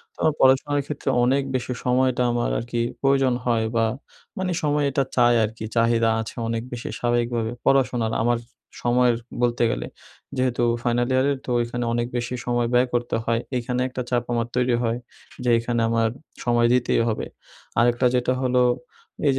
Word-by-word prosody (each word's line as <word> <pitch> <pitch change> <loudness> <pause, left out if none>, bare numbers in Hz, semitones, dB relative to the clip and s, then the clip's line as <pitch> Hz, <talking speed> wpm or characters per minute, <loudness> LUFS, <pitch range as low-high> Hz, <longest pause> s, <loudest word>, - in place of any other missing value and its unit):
তো - - -10 0.2
পড়াশোনার 135 +2 +4
ক্ষেত্রে 145 -1 -4
অনেক 135 +3 +2
বেশি 125 0 -2
সময়টা 130 0 +2
আমার 120 0 0
আর - - -2
কি 120 - 0 0.2
প্রয়োজন 135 -2 +3
হয়, 115 -2 +1
বা 115 -1 +3 0.5
মানে 185 -1 -1
সময় 145 -1 +1
এটা 135 +1 +1
চায় 120 -1 +5
আর 110 - 0
কি 110 - -5
চাহিদা 115 0 +3
আছে 110 - -8
অনেক 115 0 -2
বেশি 120 -1 -5
স্বাভাবিকভাবে 120 -1 0
পড়াশোনার 125 -4 +2
আমার 120 0 +2 0.4
সময়ের 120 0 +3 0.3
বলতে 120 0 +2
গেলে - - -3 0.5
যেহেতু 130 -2 0 0.2
ফাইনাল 120 0 +1
ইয়ারে 130 +2 +3
তো - - -7
ওইখানে 120 +1 -2
অনেক 120 0 0
বেশি 120 +1 -3
সময় 120 -1 +1
ব্যয় 125 +1 +4
করতে 120 0 0
হয়। 115 0 +1 0.2
এখানে 125 +1 -2
একটা 130 0 -5
চাপ 120 -1 +1
আমার 115 -1 0
তৈরি 125 -1 +2
হয় 115 0 0 0.5
যেখানে 115 0 +2
আমার 115 -1 +2 0.3
সময় 120 -1 +3
দিতেই 125 -2 +2
হবে 110 - -2 0.5
আরেকটা 120 +1 +3
যেটা 125 +1 +1
হল 130 0 0 0.7
এই 140 - +4
120 Hz, 165 wpm, -23 LUFS, 120-130 Hz, 0.7 s, চায়